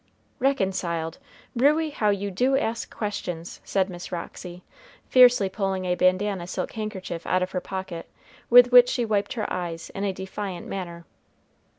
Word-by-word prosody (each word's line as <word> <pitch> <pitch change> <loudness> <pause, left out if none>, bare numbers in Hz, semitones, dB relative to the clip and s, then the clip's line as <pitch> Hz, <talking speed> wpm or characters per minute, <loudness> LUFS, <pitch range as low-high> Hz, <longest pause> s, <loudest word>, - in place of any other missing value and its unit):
"Reconciled! 190 - -1 0.4
Ruey, 300 +5 +3
how 215 -7 +1
you 200 0 -1
do 255 +8 +2
ask 230 -4 -2
questions!" 180 -5 -5
said 190 -1 0
Miss 180 -1 -8
Roxy, 180 +1 -7 0.4
fiercely 245 -5 +6
pulling 190 -1 -2
a 180 - +1
bandanna 185 0 +1
silk - - -4
handkerchief 200 -6 -5
out 185 0 +2
of 185 - -4
her 180 - -2
pocket, 190 -3 -6 0.4
with 245 +1 +8
which 245 0 +8
she 240 - 0
wiped 210 -2 0
her 220 -4 -3
eyes 170 -2 -5
in 195 - -5
a 200 - +1
defiant 190 -1 -6
manner. 170 -3 -6
195 Hz, 155 wpm, -25 LUFS, 180-220 Hz, 0.4 s, with